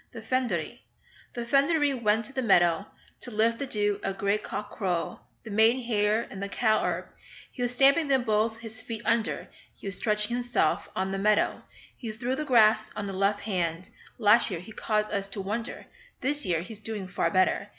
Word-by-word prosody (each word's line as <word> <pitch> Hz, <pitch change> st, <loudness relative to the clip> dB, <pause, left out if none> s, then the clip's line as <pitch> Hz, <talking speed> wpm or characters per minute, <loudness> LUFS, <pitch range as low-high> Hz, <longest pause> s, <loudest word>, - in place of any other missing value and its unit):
THE 225 Hz, -, -8 dB
FYNODEREE 240 Hz, -5 st, -1 dB, 0.5 s
The 240 Hz, -1 st, -3 dB
Fynoderee 285 Hz, +3 st, +3 dB
went 220 Hz, -3 st, +1 dB
to 270 Hz, -, -4 dB
the 265 Hz, -, -1 dB
meadow 175 Hz, -4 st, +3 dB, 0.3 s
To -, -, -5 dB
lift 230 Hz, +1 st, +1 dB
the 280 Hz, -, -3 dB
dew 205 Hz, -3 st, 0 dB
at 195 Hz, -, -2 dB
grey 200 Hz, +1 st, +1 dB
cock 205 Hz, 0 st, -6 dB
crow, 180 Hz, -4 st, -2 dB, 0.2 s
The 220 Hz, -, -8 dB
maiden 225 Hz, +5 st, +4 dB
hair 215 Hz, -1 st, +1 dB
and 195 Hz, -, -7 dB
the 200 Hz, -, -3 dB
cow 220 Hz, +1 st, +2 dB
herb -, -, -1 dB, 0.5 s
He 250 Hz, -, -8 dB
was 245 Hz, 0 st, 0 dB
stamping 280 Hz, +4 st, +5 dB
them 265 Hz, -2 st, +2 dB
both 220 Hz, 0 st, +1 dB
his 225 Hz, -1 st, -9 dB
feet 225 Hz, -1 st, -6 dB
under; 230 Hz, -1 st, 0 dB, 0.3 s
He -, -, -14 dB
was 195 Hz, -2 st, 0 dB
stretching 210 Hz, +2 st, +1 dB
himself 245 Hz, -10 st, 0 dB
on 190 Hz, +1 st, -1 dB
the 195 Hz, -, -2 dB
meadow, 210 Hz, +1 st, +2 dB, 0.3 s
He 230 Hz, -4 st, -6 dB
threw 240 Hz, +4 st, -2 dB
the 305 Hz, -, -3 dB
grass 215 Hz, -4 st, +4 dB
on 210 Hz, -, -3 dB
the 195 Hz, -, -4 dB
left 200 Hz, +2 st, +1 dB
hand; 180 Hz, -4 st, -2 dB, 0.3 s
Last 220 Hz, +1 st, +5 dB
year 180 Hz, -5 st, -3 dB
he 185 Hz, +6 st, -11 dB
caused 215 Hz, -1 st, -1 dB
us 200 Hz, -1 st, 0 dB
to 200 Hz, +1 st, -7 dB
wonder, 215 Hz, +5 st, -4 dB, 0.4 s
This 290 Hz, -2 st, 0 dB
year 165 Hz, -2 st, +1 dB
he's 210 Hz, +4 st, -8 dB
doing 215 Hz, -3 st, -5 dB
far 180 Hz, -2 st, 0 dB
better. 185 Hz, +3 st, +1 dB
215 Hz, 200 wpm, -27 LUFS, 200-240 Hz, 0.5 s, stamping